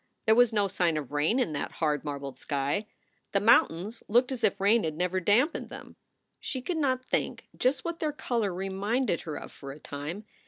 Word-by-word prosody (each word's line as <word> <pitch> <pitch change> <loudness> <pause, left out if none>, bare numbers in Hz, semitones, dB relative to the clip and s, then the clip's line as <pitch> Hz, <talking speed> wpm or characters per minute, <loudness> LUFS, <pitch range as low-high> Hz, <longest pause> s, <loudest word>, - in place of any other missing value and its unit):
There 220 - +6
was 245 0 +5
no 205 -2 +2
sign 175 -4 +1
of 145 -3 -5
rain 150 - +2
in 245 -12 +1
that 145 - -3
hard, 150 -3 0
marbled 140 -2 -5
sky. 145 +9 -1 0.5
The 200 - +4
mountains 205 0 +3
looked 245 +4 +3
as 255 - -4
if - - +2
rain 210 +4 +4
had 155 -1 -2
never 180 +1 0
dampened 225 - +2
them. - - -10 0.4
She 260 - -3
could 330 +7 -3
not 260 -4 0
think - - -2
just 260 +4 +1
what 335 -1 -3
their 310 -2 0
color 235 -8 -1
reminded 195 +3 -1
her 155 -3 -5
of - - -7
for 140 -1 -9
a 145 - -10
time. 150 +9 -6
200 Hz, 200 wpm, -29 LUFS, 155-245 Hz, 0.5 s, There